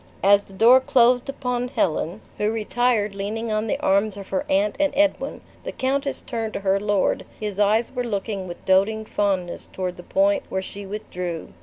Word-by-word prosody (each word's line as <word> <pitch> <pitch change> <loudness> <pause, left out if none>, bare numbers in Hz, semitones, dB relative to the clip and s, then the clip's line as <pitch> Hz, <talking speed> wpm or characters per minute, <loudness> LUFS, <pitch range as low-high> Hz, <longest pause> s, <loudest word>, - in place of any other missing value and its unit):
As 200 +1 +5
the 195 - -16
door 235 +6 +7
closed 250 0 +3
upon 250 -3 -2
Helen, 170 -7 -1 0.2
who 210 +1 +1
retired 225 -1 0
leaning 215 +3 -3
on 215 +1 0
the - - -1
arms 200 +1 +2
of 195 -1 -9
her 190 - -2
aunt 200 +2 +2
and 295 -1 +2
Edwin, 300 0 +1 0.2
the - - -4
countess 275 +2 -1
turned 225 -4 -4
to - - -4
her 195 0 +2
lord; 205 -1 +1 0.2
his 210 -2 -4
eyes 215 +3 +2
were 250 -1 -2
looking 200 -3 -3
with 175 - -9
doting 205 +4 +2
fondness 190 -5 -1
toward 180 -1 -4
the - - -8
point 195 +2 +2
where 190 0 -2
she 200 +1 -8
withdrew. 180 -5 -5
210 Hz, 185 wpm, -23 LUFS, 195-235 Hz, 0.2 s, door